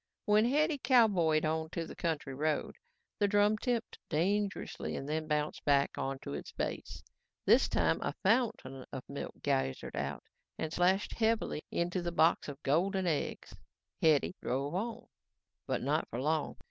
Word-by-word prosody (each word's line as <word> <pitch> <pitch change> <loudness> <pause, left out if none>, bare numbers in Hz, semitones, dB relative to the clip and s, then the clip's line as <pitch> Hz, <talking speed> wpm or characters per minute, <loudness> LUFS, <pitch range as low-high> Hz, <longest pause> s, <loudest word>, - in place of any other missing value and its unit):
When 210 0 +5
Hetty 295 +4 +2
cowboyed 195 - +4
onto 160 +2 -2
the - - -9
county 160 -5 -2
road, 150 +3 -1 0.4
the 205 - +4
drum 205 +1 +3
tipped 240 -1 -2
dangerously 200 +6 -1
and 135 - -5
then 155 +1 -2
bounced 150 -1 -1
back 140 -1 +3
onto 135 - -4
its 70 - -6
base. - - -4 0.4
This - - +5
time - - +1
a - - -2
fountain 210 - +1
of 130 -2 -5
milk - - -6
geysered 65 0 -1
out 70 +2 -3 0.3
and 160 0 -3
splashed 185 +3 +2
heavily 225 -8 0
into 175 +1 -1
the 175 0 -2
box 165 -1 +3
of 145 0 -8
golden 185 +7 +1
eggs. 160 -4 -2 0.5
Hetty 155 +1 +4
drove 140 +4 -2
on. 220 +6 -3 0.6
But - - -1
not - - +1
for 120 - -4
long. 155 +2 0
165 Hz, 150 wpm, -32 LUFS, 145-205 Hz, 0.6 s, When